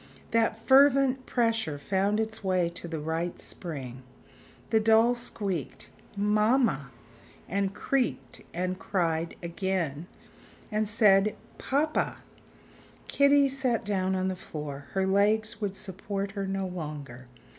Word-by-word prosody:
That 225 -1 +2
fervent 270 -1 +5
pressure 225 - 0
found 195 +7 0
its 220 0 -3
way 185 -3 +1
to 170 0 -7
the 165 -1 -4
right 160 +3 -3
spring. 130 -7 -6 0.7
The 220 - +5
doll 225 +2 +5
squeaked: 200 - -4 0.3
"Mamma!" 210 - +2 0.6
and 195 +1 -1
creaked 135 - -1
and 185 +1 -2
cried 165 -4 -1
again 170 -3 -2 0.6
and 215 0 0
said: 210 -2 +4 0.2
"Papa!" 300 +3 0 0.9
Kitty 280 0 +5
sat 260 -5 -1
down 190 -2 0
on 185 0 0
the 190 - -1
floor; 150 -5 -7
her 190 0 +1
legs 215 +3 +2
would 200 -2 -2
support 195 +1 -4
her 200 -1 -3
no 195 0 -2
longer. 150 -8 -7
195 Hz, 120 wpm, -28 LUFS, 170-220 Hz, 0.9 s, fervent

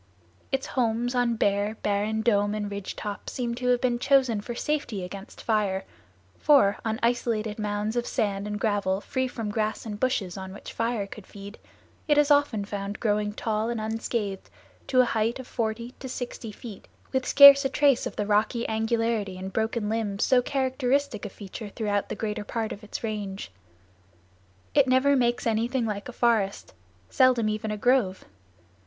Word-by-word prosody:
Its 270 0 0
homes 240 -1 0
on 245 -2 +1
bare, 205 0 +1
barren 210 +2 0
dome 205 -2 +2
and 205 -1 -3
ridge 200 -1 -5
top 205 -1 -5
seem 240 -2 -3
to 250 +1 -3
have 250 -1 +4
been 240 -1 0
chosen 260 -5 +3
for 240 +3 -6
safety 245 -9 -2
against 195 +2 -9
fire, 205 -4 0 0.5
for, 265 -10 +4
on 220 -1 -2
isolated 230 -3 0
mounds 210 +1 -2
of 240 0 -1
sand 205 -4 -1
and 210 0 -3
gravel 200 -3 0
free 260 +5 -2
from 225 -4 -4
grass 215 +1 -2
and 210 -2 -5
bushes 210 -8 -1
on 190 0 -7
which 205 - -9
fire 230 -3 -1
could 200 0 -11
feed, 200 +1 -11 0.5
it 295 -1 +4
is 295 0 +4
often 285 -8 +3
found 200 0 -5
growing 210 -2 0
tall 220 +1 -2
and 235 -1 -2
unscathed 220 -2 -3 0.4
to 255 -1 +5
a - - +3
height 225 0 0
of 260 - -8
forty 230 0 -3
to 260 - -7
sixty 245 -3 -5
feet, 210 -1 -10 0.2
with 260 -1 0
scarce 280 +1 +9
a 270 - +1
trace 280 -2 +3
of - - -8
the 210 - -1
rocky 215 +3 +1
angularity 225 -3 0
and 190 +1 -6
broken 220 0 -1
limbs 210 -2 -1
so 255 -2 +4
characteristic 260 -3 0
a - - -4
feature 205 +2 -8
throughout 205 -2 -2
the - - -3
greater 210 -1 -3
part 220 +1 -3
of 205 - -8
its 210 - -7
range. 205 - -4 1.2
It 280 -2 +4
never 260 +2 +4
makes 240 -2 +1
anything 235 +2 0
like 210 +2 -4
a - - -5
forest; 225 -5 0 0.4
seldom 250 -4 +4
even 215 +1 -2
a 210 - -2
grove. 225 -5 +1
220 Hz, 175 wpm, -26 LUFS, 205-245 Hz, 1.2 s, scarce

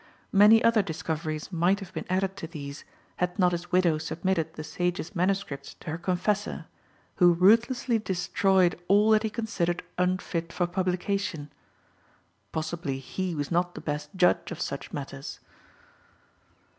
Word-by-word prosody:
Many 210 +3 +7
other 230 -2 +5
discoveries 160 -2 -4
might 180 +3 +2
have 190 -2 -10
been 160 - -5
added 190 +1 0
to 165 - -5
these, 145 -3 -8 0.3
had 180 +1 -1
not 180 -3 +4
his 175 0 -4
widow 175 -4 +3
submitted 165 +1 -1
the 155 - -6
sage's 175 +3 -3
MSS. 180 -6 -1
to - - -7
her 160 - -4
confessor, 190 +4 -1 0.5
who 175 -2 +6
ruthlessly 230 +6 +4
destroyed 185 -2 +1
all 205 +2 +5
that 215 -1 +5
he 220 - -1
considered 200 -6 -2 0.2
unfit 180 -2 -1
for 175 - 0
publication. 180 -3 -2 1.0
Possibly 160 -3 -3
he 175 +6 -4
was 145 0 -3
not 175 +1 +1
the - - -6
best 150 0 -3
judge 180 -1 +2
of 175 - -6
such 140 - -4
matters! 135 -1 -6
180 Hz, 145 wpm, -27 LUFS, 160-195 Hz, 1.0 s, Many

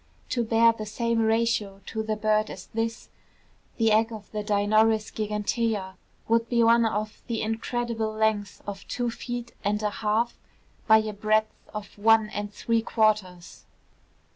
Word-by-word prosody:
To 240 - 0
bear 230 0 +4
the 215 -1 -7
same 230 +2 0
ratio 220 -3 +1
to 220 - -3
the 215 0 -2
bird 215 0 +1
as - - -8
this, 225 +1 -3 0.7
the 225 -2 +3
egg 225 +2 +3
of 215 -2 -9
the 210 -1 -3
Dinornis 215 +1 +2
gigantea 210 -1 -1 0.3
would 230 0 +2
be 235 -1 +3
of 225 -2 +2
the 230 -2 -2
incredible 225 0 -2
length 215 -2 -1
of 200 -1 -7
two 245 -1 -2
feet 240 0 -6
and 210 +1 0
a 210 - +1
half 220 +3 -1 0.5
by 220 -1 +8
a 215 -1 -4
breadth 215 +1 +1 0.2
of 210 -2 -7
one 220 0 +4
and 205 0 -4
three 230 +2 0
quarters. 210 -6 0
220 Hz, 150 wpm, -26 LUFS, 210-230 Hz, 0.7 s, by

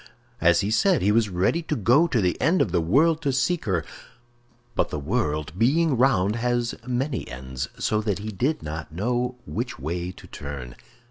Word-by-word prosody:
As 85 +2 +4
he 100 +1 -1
said, 185 - +3
he 100 - +4
was 110 0 +3
ready 95 - +1
to 155 -2 -2
go 125 - +4
to 135 -8 +1
the 90 -2 +1
end 170 +6 +3
of 95 - +1
the 85 - +2
world 155 - +3
to 145 -4 +1
seek 135 +6 0
her; 90 -7 0 0.9
but - - 0
the - - -3
world, 75 +1 -1
being 150 +5 +3
round, 115 -5 +2
has 120 0 0
many 125 +1 -2
ends, 65 +1 -5
so 110 0 0
that 105 -3 -1
he 105 +2 -5
did 135 +10 -1
not 75 0 -6
know 120 +8 -1
which 75 - -4
way 85 +6 -3
to - - -14
turn. 70 -4 -7
110 Hz, 190 wpm, -25 LUFS, 85-130 Hz, 0.9 s, As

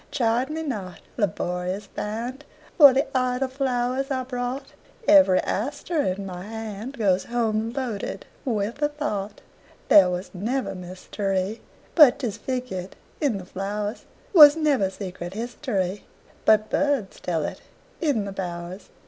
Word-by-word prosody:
Chide 245 +1 +1
me 320 +1 -3
not, 205 - -5 0.2
laborious 180 -1 -2
band, 235 +6 -5 0.4
For 285 -3 +11
the 270 +3 +2
idle 255 +1 +1
flowers 260 0 -1
I 260 -2 -1
brought; 255 +2 -4 0.3
Every 285 -12 +7
aster 290 - -2
in 195 -5 -2
my 180 -1 -6
handGoes 215 -2 -2
home 225 -2 0
loaded 245 -6 -4 0.2
with 225 0 -2
a 295 - +3
thought. 215 -10 -4 0.5
There 190 -3 +8
was 180 +1 -4
never 235 +8 -2
mysteryBut 195 - +1
'tis 235 -7 -3
figured 245 -8 -4 0.3
in 275 -9 +1
the 185 - -8
flowers; 205 +3 -4 0.3
SWas 300 -4 +10
never 290 -11 +2
secret 185 -2 -7
historyBut 215 -1 -1
birds 285 -9 0
tell 165 -4 -1
it - - -6 0.4
in 280 -11 +1
the 200 - -5
bowers. 180 0 -6
220 Hz, 125 wpm, -25 LUFS, 195-265 Hz, 0.5 s, For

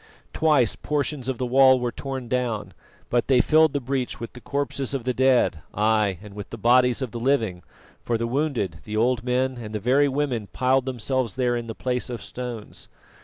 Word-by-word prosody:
Twice 150 -8 +3
portions 145 -3 -2
of 130 - -2
the 125 - -2
wall 130 +1 +5
were 120 -1 -2
torn 135 0 -5
down, 120 -4 -2 0.4
but 120 0 +1
they 130 -2 +4
filled 155 +3 +4
the 140 - 0
breach 130 -1 -3
with 115 - -7
the 125 - -11
corpses 140 -1 -2
of 130 - -3
the 125 +1 0
dead, 130 -10 +3 0.2
ay! 105 -2 +2
and 105 -1 -11
with 105 -1 -8
the 115 - -7
bodies 125 +3 +3
of 125 - -5
the 120 - -5
living, 115 -8 0 0.4
for 115 - -1
the 115 - -2
wounded, 120 - -1
the 110 0 -4
old 120 +1 +2
men 130 +1 0
and 110 -2 -7
the - - -1
very 135 +6 +3
women 135 -6 -1
piled 130 +3 +1
themselves 125 -2 -2
there 125 -2 +1
in 120 -1 -4
the 115 - -6
place 125 0 -2
of 120 -2 -5
stones. 120 -4 -7
125 Hz, 205 wpm, -24 LUFS, 115-135 Hz, 0.4 s, wall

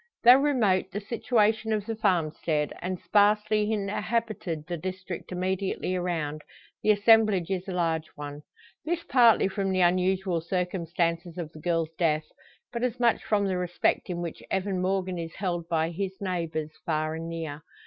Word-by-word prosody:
Though 245 +2 +9
remote 225 -10 +2
the 205 - -3
situation 220 0 +1
of 210 -2 0
the 225 0 -3
farm 175 -8 +1
stead, 150 -2 -1
and 185 0 -3
sparsely 210 +1 +3
inhabited 210 -5 -2
the 175 - -3
district 185 +1 -6
immediately 185 0 -1
around, 160 -4 -2 0.4
the - - 0
assemblage 210 -3 +4
is 185 0 -2
a - - -3
large 165 -3 0
one. 145 0 -7 0.4
This 340 +1 -2
partly 235 -8 +5
from 195 0 -1
the 185 0 +1
unusual 185 0 +2
circumstances 170 -1 -2
of 165 -3 -5
the 155 - -12
girl's 165 -1 -1
death, 155 -2 +2 0.5
but 235 - -3
as 250 0 -1
much 235 -1 +3
from 205 -2 +1
the 190 -2 0
respect 180 +1 0
in 175 -1 -3
which 170 - -6
Evan 190 -1 -1
Morgan 185 -1 -1
is 165 -1 -6
held 175 -3 -3
by 165 0 +1
his 190 +2 -4
neighbours, 165 -5 -3
far 155 -2 -1
and 165 +1 -5
near. 160 -3 -5
185 Hz, 165 wpm, -27 LUFS, 165-205 Hz, 0.5 s, Though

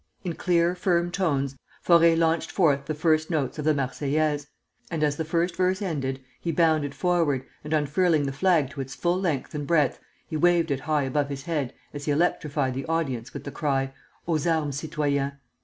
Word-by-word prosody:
In 175 -3 -2
clear, 170 0 +2
firm 175 -1 +1
tones, 140 -8 0 0.3
Faure 170 -1 +6
launched 165 0 +1
forth 145 -7 +2
the 155 +2 -3
first 155 0 +2
notes 155 -3 -1
of 150 - -3
the 155 - +4
'Marseillaise;' 145 +2 0 0.4
and 160 -2 -1
as 145 -1 +2
the 160 - -2
first 170 +2 0
verse 185 +1 +1
ended, 140 -9 -2 0.2
he 170 - -2
bounded 155 -3 +2
forward, 165 -7 +1 0.2
and 150 - -7
unfurling 155 +1 +2
the 135 - -1
flag 150 -2 +2
to 140 -1 -5
its 135 -1 -7
full 175 +5 0
length 160 -8 -1
and 145 -2 -4
breadth, 150 -6 +2 0.3
he - - -5
waved 170 -1 +3
it 135 - 0
high 150 0 0
above 140 +2 0
his 135 -1 -5
head 150 -7 -2 0.2
as 145 -1 -6
he 150 - +1
electrified 145 -4 +1
the 135 +4 -5
audience 135 -7 -2
with - - -7
the 140 - -6
cry, 135 -3 -1 0.3
'Aux 165 0 +1
armes 155 -4 0
citoyens!' 140 -2 -1
155 Hz, 190 wpm, -26 LUFS, 140-170 Hz, 0.4 s, Faure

